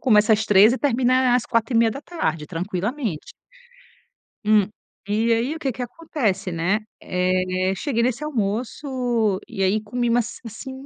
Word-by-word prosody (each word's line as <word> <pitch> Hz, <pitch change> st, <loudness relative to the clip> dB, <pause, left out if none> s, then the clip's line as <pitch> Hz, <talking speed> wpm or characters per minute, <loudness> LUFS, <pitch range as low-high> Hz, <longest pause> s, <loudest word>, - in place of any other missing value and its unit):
começa 220 Hz, -3 st, +4 dB
às 215 Hz, 0 st, +2 dB
15:00 210 Hz, +2 st, +6 dB
e 260 Hz, -, -1 dB
termina 255 Hz, -1 st, +2 dB
à -, -, +5 dB
às 245 Hz, -1 st, +2 dB
16:30, 230 Hz, -, 0 dB
tranquilamente. 185 Hz, -, -3 dB, 1.1 s
Hum, 210 Hz, -2 st, +4 dB, 0.4 s
e 220 Hz, +3 st, +1 dB
aí 240 Hz, +7 st, 0 dB
o -, -, -7 dB
que 275 Hz, -4 st, -1 dB
que 250 Hz, +1 st, -5 dB
acontece, 235 Hz, -, -2 dB
né? 175 Hz, +5 st, 0 dB, 0.2 s
Eh, 185 Hz, +1 st, 0 dB
cheguei 235 Hz, +3 st, -1 dB
nesse 250 Hz, +4 st, 0 dB
almoço 240 Hz, -3 st, -1 dB
e 195 Hz, -, -5 dB
aí 200 Hz, +3 st, +2 dB
comi, 240 Hz, +3 st, -1 dB
mas, 235 Hz, 0 st, 0 dB
assim, 230 Hz, +4 st, -8 dB
225 Hz, 145 wpm, -23 LUFS, 195-250 Hz, 1.1 s, 15:00